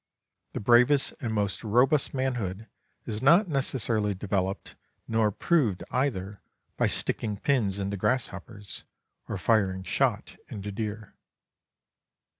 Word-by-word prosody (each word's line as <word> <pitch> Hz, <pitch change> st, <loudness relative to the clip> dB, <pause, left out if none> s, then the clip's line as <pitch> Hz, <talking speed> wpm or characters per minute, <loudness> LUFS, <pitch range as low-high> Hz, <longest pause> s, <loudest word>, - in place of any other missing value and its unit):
The -, -, -3 dB
bravest 125 Hz, +6 st, +4 dB
and 120 Hz, -5 st, -3 dB
most 105 Hz, -1 st, -1 dB
robust 125 Hz, +7 st, +3 dB
manhood 115 Hz, -6 st, -2 dB, 0.4 s
is 105 Hz, -1 st, -3 dB
not 170 Hz, +9 st, +5 dB
necessarily 115 Hz, -, +1 dB
developed 95 Hz, 0 st, -2 dB, 0.3 s
nor 110 Hz, -1 st, +2 dB
proved 110 Hz, -, +1 dB
either 105 Hz, -7 st, -2 dB, 0.3 s
by -, -, +2 dB
sticking 105 Hz, -3 st, -1 dB
pins 105 Hz, -6 st, +1 dB
into 100 Hz, 0 st, -3 dB
grasshoppers 105 Hz, -3 st, -3 dB, 0.5 s
or -, -, -2 dB
firing 95 Hz, -4 st, +1 dB
shot -, -, -1 dB
into 105 Hz, 0 st, -6 dB
deer. 105 Hz, 0 st, -5 dB
110 Hz, 110 wpm, -27 LUFS, 100-125 Hz, 0.5 s, not